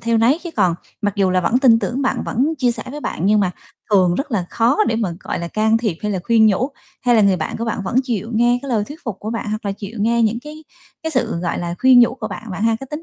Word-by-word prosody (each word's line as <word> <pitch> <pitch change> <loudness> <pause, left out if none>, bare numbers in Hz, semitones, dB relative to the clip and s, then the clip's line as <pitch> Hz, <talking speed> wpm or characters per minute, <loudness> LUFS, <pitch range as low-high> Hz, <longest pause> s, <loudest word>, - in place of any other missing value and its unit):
theo 230 0 +1
nấy, 245 +7 +3
chứ 345 - -5
còn 185 -5 +3 0.3
mặc 205 -1 0
dù 195 -2 +2
là 185 0 +2
vẫn 225 +8 +2
tin 245 -4 +5
tưởng 255 +3 -2
bạn 265 - 0
vẫn 280 +7 0
chia 250 -2 +2
sẻ 235 - -4
với 295 +2 -7
bạn - - -4
nhưng 210 +1 +4
mà 190 -3 +1 0.4
thường 185 -4 +4
rất 280 - -3
là 205 -7 0
khó 235 +3 +2
để 225 - 0
mà, 210 -6 -1
gọi - - -4
là, 170 - -4
can 220 +4 +2
thiệp 215 -8 -2
hay 210 -1 -1
là 190 - -1
khuyên 225 -2 +4
nhủ? 215 +5 +2 0.3
Hay 245 -1 +3
là 225 - +5
người 200 -2 +4
bạn 155 - -4
của 230 - -3
bạn 225 -3 -2
vẫn 230 - -2
chịu 230 -4 -3
nghe 240 +2 +3
cái 280 - -7
lời 220 -5 +1
thuyết 295 +7 -10
phục 230 -7 -4
của 215 - -5
bạn, 230 -1 -4
hoặc 215 +1 -4
là 200 - 0
chịu 205 +3 -9
nghe 235 +2 +2
những 225 +1 +1
cái 305 +3 -11 0.4
cái 320 - -2
sự, 255 - -1
gọi 170 -1 -2
là, 170 0 -3
khuyên 260 -1 +6
nhủ 240 0 +4
của 225 -4 -5
bạn, 210 +2 -8
bạn 190 +2 -4
ha? 225 0 +2
Cái 270 - -7
tính 300 +2 -5
225 Hz, 300 wpm, -19 LUFS, 200-245 Hz, 0.4 s, khuyên